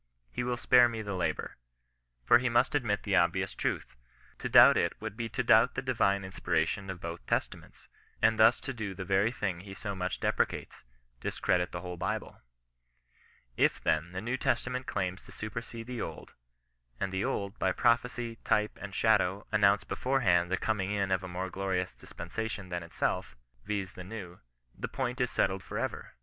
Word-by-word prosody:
He 95 - -2
will 120 0 -1
spare 120 0 +6
me 115 -2 -4
the 100 -1 -4
labour. 90 - -2 0.7
For 120 - +7
he 125 +1 0
must 120 +1 +3
admit 115 -8 0
the 100 -2 +1
obvious 95 +2 +2
truth. - - -3 0.4
To - - -3
doubt - - +9
it - - 0
would - - -5
be 115 0 -3
to - - -1
doubt - - +5
the - - -1
divine 100 0 +2
inspiration 95 +1 -1
of 95 -2 -5
both 85 0 -6
Testaments, - - -3 0.3
and 110 0 +3
thus 110 +3 +6
to 135 - -4
do 105 -5 -5
the 95 - -5
very 100 +4 +2
thing 95 -7 -2
he 95 +1 -9
so 100 +1 -4
much 90 -1 -3
deprecates - - -1 0.2
— - - -39
dis - - -4
credit 90 0 +1
the 85 - -5
whole 90 -1 -6
Bible. - - -3 1.1
If, - - +3
then, 80 +3 0
the 95 +1 -4
New 120 +4 -2
Testament 125 +1 -1
claims 95 -2 -2
to - - -12
supersede 115 +2 -6
the 125 -1 -5
Old, - - -7 0.7
and 95 - -1
the 95 +1 -1
Old, 100 +1 -2
by 95 - +2
prophecy, 120 +1 +1
type, 105 0 0
and 100 -2 -7
shadow, 105 -3 +2
announced 100 0 +3
beforehand 90 -10 +2
the 95 - +1
coming 105 -4 -1
in 100 -2 0
of 95 -1 +2
a - - -5
more 90 +1 -4
glorious 95 -1 -1
dispensation 100 +2 -6
than 90 -1 -3
itself, 85 -5 -2 0.3
viz. 100 -3 -3
the 90 - -8
New, 90 -3 -8 0.4
the - - -4
point 125 +1 -3
is 125 - +2
settled 95 0 +1
for - - -6
ever. - - -4
100 Hz, 190 wpm, -30 LUFS, 95-115 Hz, 1.1 s, doubt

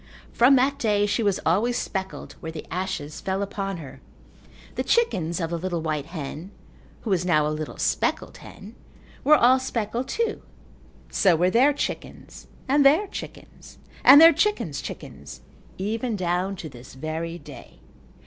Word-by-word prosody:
From 250 +4 +5
that 275 +2 +2
day 210 -4 +2
she 205 +2 0
was 200 -3 +1
always 220 +9 +2
speckled 190 -1 -5
where 160 - -6
the 160 -1 -8
ashes 180 -5 -4
fell 195 +1 -2
upon 195 -1 -4
her. 145 -5 -11 0.7
The - - -2
chickens 180 - +1
of 165 -1 -3
the 170 - -2
little 175 -2 -3
white 155 -2 -2
hen 160 +1 -7 0.5
(who 220 - -4
was 180 -2 +2
now 155 -4 +2
a - - 0
little 155 0 -6
speckled - - -1
hen) 205 +3 -12 0.5
were 305 +2 +6
all 255 0 +5
speckled 240 -1 -3
too. 460 -1 -2 0.7
So 185 -4 +3
were 180 +3 +2
their 255 +7 +5
chickens 290 - -6 0.2
and 285 +2 +4
their 305 +9 +5
chickens - - -10 0.3
and 275 +3 +10
their 330 +1 +9
chickens' 420 0 -1
chickens, - - -9 0.4
even 225 +4 -2
down 185 +1 -1
to 180 -4 -7
this 125 -2 -13
very 160 +4 -4
day. - - -13
195 Hz, 160 wpm, -24 LUFS, 165-245 Hz, 0.7 s, and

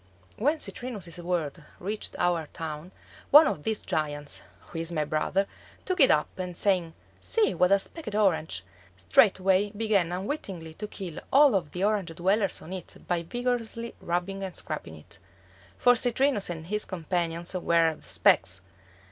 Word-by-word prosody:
When 290 +8 +1
Citrinus's 205 - -4
world 170 -3 -2 0.2
reached 205 +4 -4
our 175 -3 +1
town, 160 +2 -6 0.4
one 300 +3 +9
of 150 - -1
these 220 +5 -2
giants, 145 -2 -2 0.2
who 165 - -8
is 165 +1 -2
my 155 -3 0
brother, 155 +6 0 0.4
took 370 -1 -1
it 270 - +8
up, 150 - +4
and 180 -2 -4
saying, 180 -5 +1 0.2
"See, 445 -2 +2
what 180 +1 +3
a 200 - +7
specked 215 - -5
orange," 160 - +1 0.3
straightway 190 - +4
began 205 -5 +1
unwittingly 185 - -4
to 210 +6 -6
kill 185 -6 -7
all 280 -1 +7
of 170 -7 0
the 180 - -3
Orange 200 -5 0
dwellers 195 +3 +1
on 180 - -8
it 185 -3 -7
by 175 -1 +1
vigorously 235 +3 -3
rubbing 180 +3 -2
and 190 -2 -5
scraping - - -5
it. - - -12 0.6
For 245 0 +5
Citrinus 245 -2 +2
and 165 -2 -5
his 210 +4 -2
companions 170 -1 -2
were 170 -3 +3
the - - -16
specks! 90 +1 +3
185 Hz, 155 wpm, -28 LUFS, 165-215 Hz, 0.6 s, one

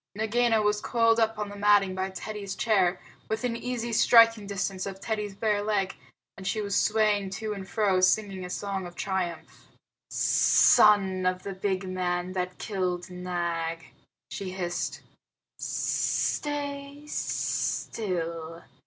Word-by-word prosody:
Nagaina 225 0 +2
was 210 0 +1
coiled 230 -1 +3
up 225 -1 +1
on 210 -1 -3
the 205 - -8
matting 205 -2 +4
by 190 +1 -2
Teddy's 200 0 -6
chair, 190 -6 +2 0.3
within 230 +2 -1
easy 235 -1 -3
striking 230 -2 +6
distance 195 -1 -3
of 195 -1 -7
Teddy's 210 -1 -3
bare 210 0 +1
leg, 205 -2 0 0.4
and 190 -1 -7
she 215 - 0
was 200 -1 -2
swaying 210 -2 +2
to 215 +2 -4
and 195 -2 -8
fro, 195 -4 +2
singing 190 0 +2
a 180 - -6
song 195 -1 -3
of 175 - -12
triumph. 185 -4 -4 0.4
"Son 190 -3 +4
of 185 0 -1
the 200 - -5
big 190 0 -2
man 180 -1 -2
that 180 -1 -3
killed 185 -3 -3
Nag," 170 -2 -3 0.4
she 195 - -5
hissed, 180 -2 -3 0.6
"stay 285 -1 -2
still. 170 - -2
195 Hz, 135 wpm, -27 LUFS, 185-215 Hz, 0.6 s, striking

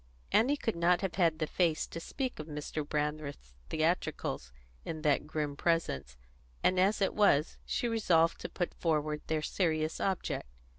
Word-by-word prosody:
Annie 275 +6 +4
could 225 -7 -1
not 175 +1 +3
have 195 -3 -1
had 165 -4 +3
the 155 - 0
face 165 0 +1
to 165 - -7
speak 255 - -4
of 155 - -6
Mr. 150 0 -4
Brandreth's 150 - -3 0.2
theatricals 155 - -1 0.3
in 155 -1 -5
that 150 -1 +2
grim 150 -2 -2
presence; 140 - 0 0.5
and 185 0 +3
as 200 +2 +3
it - - +1
was, 165 -8 +3
she 240 - 0
resolved 175 -8 +3
to - - -4
put 175 - -2
forward 155 -2 0
their 155 -1 0
serious 155 -4 0
object. 190 - -1
160 Hz, 160 wpm, -32 LUFS, 150-185 Hz, 0.5 s, Annie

